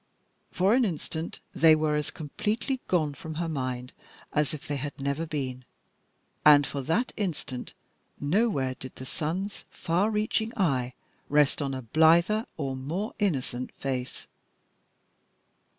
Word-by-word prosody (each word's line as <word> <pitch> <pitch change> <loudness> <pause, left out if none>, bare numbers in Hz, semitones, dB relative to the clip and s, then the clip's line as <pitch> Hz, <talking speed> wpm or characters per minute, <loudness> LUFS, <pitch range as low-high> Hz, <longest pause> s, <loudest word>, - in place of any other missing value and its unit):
For 190 +4 +3
an 255 +1 +5
instant 165 -4 -3
they 160 -1 +7
were 155 -1 +1
as 150 -1 -1
completely 215 - -2
gone 155 -5 +2
from 160 +2 -7
her 170 +1 -1
mind 130 -4 -3 0.4
as 150 -2 +2
if 155 - -6
they 145 - -1
had 145 +1 -5
never 140 +4 -1
been, 130 -4 -3 0.8
and 145 -1 +8
for 140 - -4
that 165 - 0
instant 155 -10 -3 0.4
nowhere 145 - +1
did 130 0 -9
the 130 - -8
sun's 180 +9 -3
far 180 +6 +1
reaching 220 +1 0
eye 130 - +1 0.3
rest 145 0 +3
on 135 -2 -1
a 130 - -5
blither 165 - +4
or 135 -4 -2
more 165 - -3
innocent 130 - -1
face. 130 -2 -4
150 Hz, 135 wpm, -28 LUFS, 135-185 Hz, 0.8 s, and